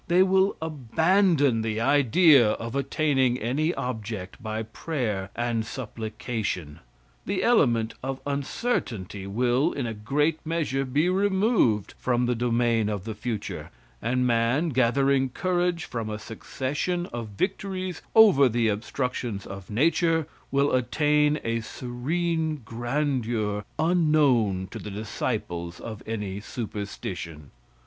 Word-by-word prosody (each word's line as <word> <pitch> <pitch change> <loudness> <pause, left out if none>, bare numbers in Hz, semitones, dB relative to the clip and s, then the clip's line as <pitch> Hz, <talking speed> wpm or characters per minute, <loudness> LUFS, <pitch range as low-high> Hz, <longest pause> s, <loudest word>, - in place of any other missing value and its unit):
They 180 +2 +5
will 190 +1 +3
abandon 160 - +2
the 110 0 -2
idea 135 -1 +5
of 115 +2 -5
attaining 135 -3 +1
any 140 +8 0
object 110 -6 -5
by 110 0 -3
prayer 110 -5 -3
and 120 -1 0
supplication. 110 - -4 0.5
The - - 0
element 115 -1 +3
of 135 0 -3
uncertainty 130 - -2
will, 120 +6 +2
in 135 - -2
a 115 - -3
great 145 +9 0
measure, 155 -4 -1
be 145 +6 +1
removed 190 - +2
from 125 -1 +1
the 125 - +1
domain 115 -2 +1
of 105 -3 -3
the 110 +1 -4
future, 110 0 -5 0.3
and 125 +1 +1
man, 120 +7 +2
gathering 135 +1 +2
courage 175 +2 0
from 115 -3 -4
a 105 - -3
succession 140 - -3
of 120 -2 -4
victories 185 -2 -2
over 190 - +7
the 115 -1 +1
obstructions 115 -1 -3
of 95 -1 -9
nature, 160 +6 +2 0.2
will 140 +1 +2
attain 150 +4 +2
a 115 0 0
serene 155 +6 -2
grandeur 120 -4 -1
unknown 150 - +3
to - - -6
the - - -7
disciples 90 -4 -4
of 110 -2 -7
any 105 -3 -3
superstition. 100 - -6
125 Hz, 120 wpm, -26 LUFS, 110-155 Hz, 0.5 s, over